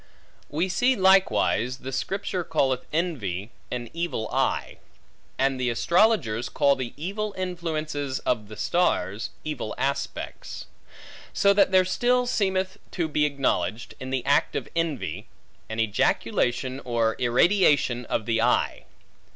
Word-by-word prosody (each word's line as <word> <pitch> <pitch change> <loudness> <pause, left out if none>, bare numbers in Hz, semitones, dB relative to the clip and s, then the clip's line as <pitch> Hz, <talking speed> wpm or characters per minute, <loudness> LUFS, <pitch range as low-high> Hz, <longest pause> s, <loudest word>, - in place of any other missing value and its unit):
We 160 +6 0
see 245 +8 +2
likewise, 185 - +3
the 135 0 -7
Scripture 190 +4 -2
calleth 135 -6 0
envy 120 - -2 0.2
an 120 -1 -4
evil 170 -9 -2
eye; - - -1 0.6
and 135 -1 +1
the 125 -1 +1
astrologers, 125 - +2
call 140 -2 +3
the 130 -3 -5
evil 200 +6 -3
influences 155 -6 -3
of 110 -4 -1
the 110 0 -10
stars, 110 - 0
evil 150 -8 -4
aspects; 140 +1 -3 0.7
so 200 0 +4
that 200 - +5 0.2
still 245 +6 +2
there - - -3
seemeth 190 -5 0
to 170 -3 0
be 150 -1 +1
acknowledged, 120 -7 -1
in 130 - -6
the 130 -1 -2
act 140 +1 +2
of - - -2
envy, 165 -5 -2 0.4
an 110 +1 -4
ejaculation 120 +4 0
or 115 -2 +1
irradiation 130 -1 +3
of 110 - -2
the 115 -1 +1
eye. 125 +1 +1
140 Hz, 130 wpm, -25 LUFS, 120-180 Hz, 0.7 s, that